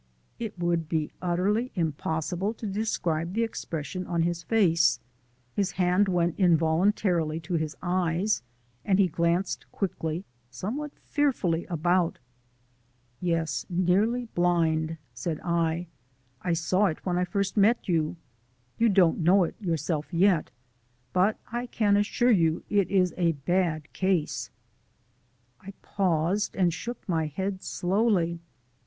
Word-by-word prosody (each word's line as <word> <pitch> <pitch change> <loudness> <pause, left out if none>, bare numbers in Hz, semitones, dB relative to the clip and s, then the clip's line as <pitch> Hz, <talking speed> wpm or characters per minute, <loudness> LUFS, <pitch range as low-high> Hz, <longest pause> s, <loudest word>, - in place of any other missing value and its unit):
It 220 -4 -5
would 170 -2 0
be 155 -3 -1
utterly 195 +8 0
impossible 170 +4 -1
to 220 - -8
describe 180 -5 -1
the 230 - +2
expression 180 -5 -4
on 170 -2 +1
his 170 0 -1
face. 170 -5 +3 0.5
His 195 -2 -1
hand 180 +2 +2
went 175 -2 0
involuntarily 170 -1 +2
to 175 +3 -6
his 155 -2 -1
eyes, 180 - +1 0.4
and 190 -2 +2
he 195 -2 +4
glanced 170 +3 -1
quickly, 170 -2 -3 0.2
somewhat 220 - -4
fearfully, 225 - 0
about. 175 +1 +1 1.0
"Yes, 165 -6 -1
nearly 195 +7 +2
blind," 165 -5 +1 0.2
said 150 +6 -3
I. 170 0 0 0.6
"I 175 - 0
saw 185 +5 +2
it 160 - -4
when 180 -1 0
I - - +2
first 200 +1 -1
met 220 +3 +3
you. 165 -2 +1 0.6
You 230 0 +4
don't 185 -5 +4
know 180 +3 +5
it 170 - -2
yourself 160 -3 -2
yet, 175 -2 +3 0.6
but 190 +4 +3
I 240 +1 -3
can 210 -4 +2
assure 225 +4 +2
you 165 -6 +2
it 200 -3 +2
is 185 -2 +2
a 170 -2 +2
bad 155 +1 -1
case." 185 -5 0 1.1
I 195 +1 -10
paused, 185 +1 0
and 180 -3 +2
shook 235 +8 -6
my 160 -4 0
head 190 +5 -3
slowly. 180 -3 +1
180 Hz, 130 wpm, -27 LUFS, 165-200 Hz, 1.1 s, know